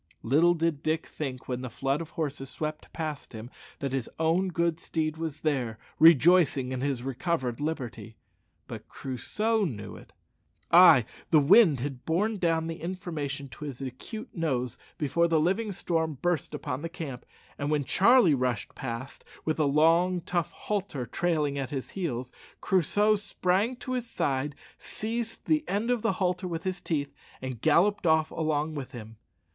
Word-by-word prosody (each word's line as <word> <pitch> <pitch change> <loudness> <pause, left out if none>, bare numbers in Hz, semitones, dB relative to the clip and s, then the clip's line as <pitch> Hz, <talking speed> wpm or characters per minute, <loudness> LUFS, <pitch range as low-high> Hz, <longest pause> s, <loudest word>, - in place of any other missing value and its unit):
Little 160 +8 +4
did 165 -3 0
Dick 155 0 0
think, 130 -4 -6
when 125 -1 -3
the 130 - -5
flood 135 +6 -1
of 165 - -7
horses 145 -4 -3
swept 155 +1 -5
past 155 -5 -5
him, 110 +3 -8 0.3
that 140 -2 -3
his 135 -3 -2
own 165 +4 +2
good 170 -2 0
steed 155 -1 -2
was 160 -2 -4
there, 130 -8 -1 0.2
rejoicing 160 -4 +6
in 130 -1 -3
his 135 -3 -1
recovered 130 -1 -2
liberty. 120 -8 -4 0.5
But - - -8
Crusoe 210 - -1
knew 115 - -4
it. - - -15 0.6
Ay, 170 -9 +8 0.2
the 160 - +5
wind 160 - +6
had 135 -2 -5
borne 205 +7 0
down 165 -3 +1
the 165 0 -5
information 165 -6 -4
to 150 - -9
his 135 -4 -6
acute 140 - -7
nose 130 - -1 0.2
before 170 +3 +2
the 165 -1 +3
living 195 +7 +1
storm 160 -5 -1
burst 175 -1 -1
upon 130 +2 -4
the 165 - -4
camp; 155 -8 -6 0.4
and 145 0 -1
when 150 -1 +1
Charlie 215 - +5
rushed 125 -5 -1
past, 130 0 -6 0.2
with 155 - 0
the 155 -2 +2
long 165 +5 +3
tough 175 -1 -1
halter 190 -10 -3
trailing 150 -3 0
at 135 -2 -3
his 135 -2 -5
heels, 130 -10 -3 0.3
Crusoe 205 +3 +3
sprang 200 +3 0
to 255 +1 -5
his 245 -2 -3
side, 140 -5 -1 0.2
seized 225 +1 -4
the 310 -1 +2
end 215 +5 0
of 245 -3 +1
the 195 - +1
halter 180 0 -1
with 165 -1 -4
his 185 -1 -3
teeth, 145 -4 -2 0.3
and 130 -3 -6
galloped 175 +5 +3
off 160 0 +3
along 155 -1 -1
with 140 -4 -6
him. 110 -2 -9
160 Hz, 165 wpm, -28 LUFS, 135-180 Hz, 0.6 s, Ay